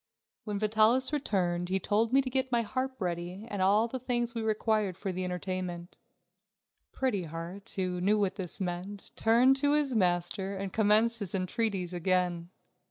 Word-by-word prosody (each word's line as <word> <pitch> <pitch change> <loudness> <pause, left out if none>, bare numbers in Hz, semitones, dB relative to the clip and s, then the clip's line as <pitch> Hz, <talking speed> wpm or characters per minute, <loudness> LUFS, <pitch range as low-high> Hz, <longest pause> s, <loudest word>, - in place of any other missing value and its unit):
When 210 -2 -2
Vitalis 220 +6 +3
returned, 180 -10 0
he 190 +1 +1
told 220 +4 +1
me 270 +1 +4
to 260 - -3
get 260 0 0
my 235 -1 +2
harp 260 +3 -3
ready 180 +2 -4
and 205 -4 -4
all 205 +4 +4
the 260 +2 -5
things 240 -1 -1
we 230 - -3
required 215 -3 0
for 195 0 -3
the 185 0 -3
entertainment. 180 -1 -4 1.0
Pretty 210 -9 -1
Heart, 165 +5 -7
who 180 -2 -2
knew 205 +3 +3
what 200 -2 +1
this 185 -3 -6
meant, 190 +2 -5
turned 245 +4 +4
to 285 +1 +2
his 295 -3 +1
master 190 0 0
and 195 -1 -5
commenced 220 +2 +3
his 200 -3 -4
entreaties 190 -1 -1
again. 175 -1 0
200 Hz, 165 wpm, -30 LUFS, 180-230 Hz, 1.0 s, me